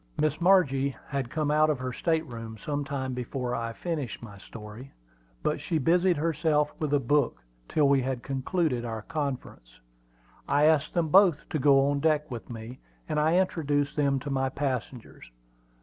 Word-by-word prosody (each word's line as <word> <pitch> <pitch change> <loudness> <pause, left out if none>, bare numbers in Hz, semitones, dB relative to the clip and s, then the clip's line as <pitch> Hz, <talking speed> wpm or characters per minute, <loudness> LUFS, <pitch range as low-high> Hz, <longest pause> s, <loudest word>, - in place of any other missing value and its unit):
Miss 155 +1 0
Margie 140 -8 +3
had 135 -3 -2
come 150 0 -1
out 155 +1 +4
of 150 - +1
her 130 0 -4
state 160 +4 0
room 115 -4 -8
some 145 +6 -3
time 135 -2 -3
before 125 0 -3
I 115 -1 -2
finished 145 -4 -4
my 105 -4 -10
story; 110 +6 -10 0.5
but - - 0
she 165 - -1
busied 175 +4 +3
herself 150 -1 +1
with 155 -3 -2
a - - +3
book 145 - +1 0.3
till 150 -2 +3
we 140 -1 +4
had 130 -1 -3
concluded 135 -1 -1
our 110 -2 -5
conference. 130 - -5 0.7
I 145 +1 +3
asked 155 -1 +3
them 170 -2 +1
both 180 -3 +5
to 155 - 0
go 135 0 +5
on 145 - 0
deck 150 -1 +1
with 115 -6 -7
me, 120 +2 -8 0.3
and 155 -1 0
I 155 +3 +3
introduced 145 -6 0
them 140 -2 +2
to 145 - -5
my 135 -1 0
passengers. 130 - -4
140 Hz, 175 wpm, -28 LUFS, 125-155 Hz, 0.7 s, both